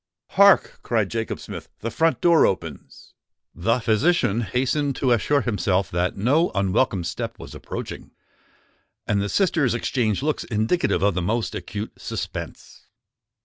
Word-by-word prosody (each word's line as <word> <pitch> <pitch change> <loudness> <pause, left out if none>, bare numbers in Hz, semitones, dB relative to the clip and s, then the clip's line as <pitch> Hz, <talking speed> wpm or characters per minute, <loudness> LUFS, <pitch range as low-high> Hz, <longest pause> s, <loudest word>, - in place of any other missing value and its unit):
"Hark!" 200 0 +4
cried 110 -5 0
Jacob 115 -1 -3
Smith: - - -8
"the 115 - -3
front 160 -2 +1
door 170 -2 +5
opens!" 85 -7 -6 0.4
The 115 +8 0
physician 115 - +2
hastened 130 +6 0
to 130 -3 0
assure 140 +5 +2
himself 100 -5 0
that 90 +2 -1
no 140 - +2
unwelcome 100 0 +1
step 85 - -4
was - - -10
approaching; - - -7 1.0
and 100 -1 +1
the 100 - -2
sisters 160 - +2
exchanged 120 -2 -1
looks 155 0 -1
indicative 110 - 0
of 100 -1 +3
the 90 - -1
most 110 +6 -1
acute 105 +2 -6
suspense. - - -7
115 Hz, 140 wpm, -23 LUFS, 100-140 Hz, 1.0 s, door